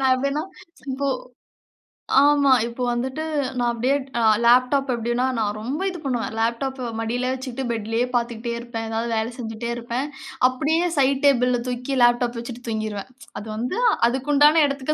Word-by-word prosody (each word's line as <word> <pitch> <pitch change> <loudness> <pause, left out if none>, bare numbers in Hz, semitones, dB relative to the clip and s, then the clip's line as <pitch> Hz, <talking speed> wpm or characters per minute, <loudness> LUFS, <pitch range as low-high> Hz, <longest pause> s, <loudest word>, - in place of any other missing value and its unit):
நான் 265 -1 +4
எப்டின்னா, 280 +3 -1 0.5
இப்ப 275 +2 -3 1.2
ஆமா. 285 -1 +4
இப்ப 235 +2 -6
வந்துட்டு 260 +5 -3 0.4
நான் 240 0 +2
அப்டியே 245 +4 +1 0.5
லேப்டாப் 255 +3 +4
எப்டின்னா 240 +2 0
நான் 210 -2 0
ரொம்ப 260 - -3
இது 360 - -6
பண்ணுவேன் 245 -5 -2
லேப்டாப்ப 245 +3 -1
மடியிலே 245 +3 -1
வச்சுக்கிட்டு 260 0 -5
பெட்லேயே 225 +1 -1
பார்த்துக்கிட்டே 235 -1 -1
இருப்பேன். 235 -1 -5
ஏதாவது 225 +1 -2
வேலை 220 +1 0
செஞ்சுகிட்டே 230 -1 -5
இருப்பேன் 240 +3 -3 0.4
அப்டியே 305 +7 +1
சைட் 275 0 +3
டேபிள்ல 250 -3 +4
தூக்கி 250 +2 -3
லேப்டாப் 240 0 +3
வச்சிட்டு 240 +1 -7
தூங்கிருவேன். 215 -1 -3 0.3
அது 210 - -9
வந்து 240 - -3 0.3
அதுக்கு 265 +4 -2
உண்டான 300 +3 +6
இடத்துக்கு 280 +1 -2
245 Hz, 145 wpm, -23 LUFS, 235-270 Hz, 1.2 s, உண்டான